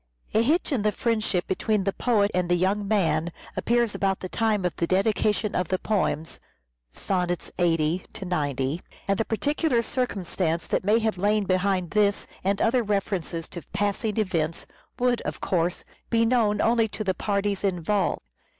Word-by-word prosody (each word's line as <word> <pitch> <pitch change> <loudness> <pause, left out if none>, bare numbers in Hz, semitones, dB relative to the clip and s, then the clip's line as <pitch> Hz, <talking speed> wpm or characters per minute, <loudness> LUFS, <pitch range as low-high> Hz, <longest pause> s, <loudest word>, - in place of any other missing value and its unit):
A 220 - +4
hitch 310 +8 +1
in 260 -6 +1
the 210 0 +2
friendship 215 -4 0
between 210 +2 0
the 195 0 0
poet 210 -4 +2
and 180 -1 0
the 175 - +4
young 195 +3 +1
man 180 -5 +1 0.2
appears 235 -2 +1
about 195 -1 0
the 185 - -6
time 215 -3 +1
of 175 - -1
the 170 - 0
dedication 210 +2 +1
of 180 - 0
the 185 - 0
poems 170 -7 -1 0.5
(sonnets 180 - -2
80 165 0 +1
90), 145 -5 -1 0.3
and 195 -1 +1
the 225 - +1
particular 250 - +1
circumstances 180 -9 -1
that - - +1
may 210 +4 +4
have 220 -4 0
lain 210 +2 +2
behind 185 -2 0
this 205 -1 +2 0.2
and 195 +1 +1
other 245 +2 +3
references 195 -6 -2
to 175 - -7
passing 205 +1 -1
events, 170 -6 -1 0.3
would, 245 -1 +1
of - - -5
course, 175 -1 0 0.3
be 230 -1 +3
known 225 -4 +2
only 230 -1 +3
to 215 - -5
the 190 -2 +1
parties 200 0 -1
involved. 195 - 0
200 Hz, 165 wpm, -26 LUFS, 180-220 Hz, 0.5 s, A